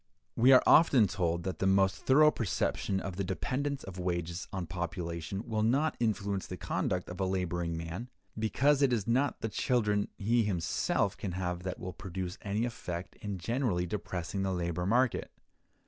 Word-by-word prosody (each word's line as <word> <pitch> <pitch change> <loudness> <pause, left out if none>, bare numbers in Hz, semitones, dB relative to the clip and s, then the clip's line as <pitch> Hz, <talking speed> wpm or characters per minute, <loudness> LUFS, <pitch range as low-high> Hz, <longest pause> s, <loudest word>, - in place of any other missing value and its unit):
We 125 +3 +6
are 130 - +8
often 140 -8 +6
told 85 -3 -1
that 95 0 -4
the 95 - +1
most 95 0 +4
thorough 150 +3 +7
perception 95 - -1
of 95 -2 -5
the 100 - 0
dependence 135 +9 -2
of 95 -1 -8
wages 85 -1 -2
on 95 -2 -3
population 85 +2 -4
will 110 -1 -1
not 135 +8 +2
influence 100 -4 -1
the - - -6
conduct 90 -1 -2
of 90 +1 -8
a 95 - +1
laboring 90 -3 -1
man, 85 +9 -5 0.3
because 135 +6 +2
it 140 -2 +4
is 110 -5 0
not 130 +4 +1
the - - -1
children 105 -3 +1
he 115 +4 +2
himself 90 -6 0
can 95 - -4
have 90 -1 -2
that 90 0 -4
will 90 0 -6
produce 95 -1 -5
any 105 +3 -1
effect 90 -7 -5
in 100 -2 -5
generally 105 -2 0
depressing 90 0 -4
the 95 0 0
labor 85 0 -2
market. 125 +3 +2
95 Hz, 175 wpm, -31 LUFS, 90-115 Hz, 0.3 s, are